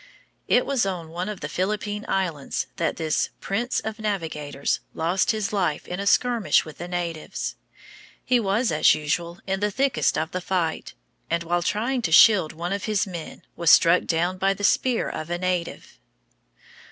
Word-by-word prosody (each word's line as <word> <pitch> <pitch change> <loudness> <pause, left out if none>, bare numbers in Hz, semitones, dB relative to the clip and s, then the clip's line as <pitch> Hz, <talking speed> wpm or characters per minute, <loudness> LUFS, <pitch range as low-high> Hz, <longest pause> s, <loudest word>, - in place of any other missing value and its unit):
It - - +3
was 275 -3 +1
on 180 -4 -3
one 175 +4 -4
of 210 - -6
the - - -3
Philippine 210 +2 -2
Islands 165 -8 -1
that 170 - 0
this 160 -2 0
"Prince 235 +6 -1
of 220 0 -5
Navigators" 160 -9 -2 0.2
lost 170 +4 +1
his 215 -2 -1
life 180 -7 -1
in 180 - -4
a 200 - -2
skirmish 240 -2 +3
with 155 - -11
the 175 - -5
natives. 170 -3 -4 0.7
He 250 -1 +3
was, 215 +3 +1
as 155 - +5
usual, 170 +3 -2
in 190 0 -1
the 210 +1 +1
thickest 265 +4 +1
of 155 +1 -2
the 185 - -3
fight, 175 -3 -2 0.3
and 170 0 0
while 175 +1 0
trying 235 +8 -1
to 165 - -2
shield 180 -2 +7
one 170 +4 -4
of 200 - -3
his 215 -3 +1
men 175 -5 -8
was 170 -2 +1
struck 170 +2 +6
down 175 +3 0
by 195 +1 +2
the 205 - -8
spear 245 +3 +2
of 155 - -5
a 175 - -1
native. 180 -1 -3
185 Hz, 175 wpm, -24 LUFS, 165-210 Hz, 0.7 s, shield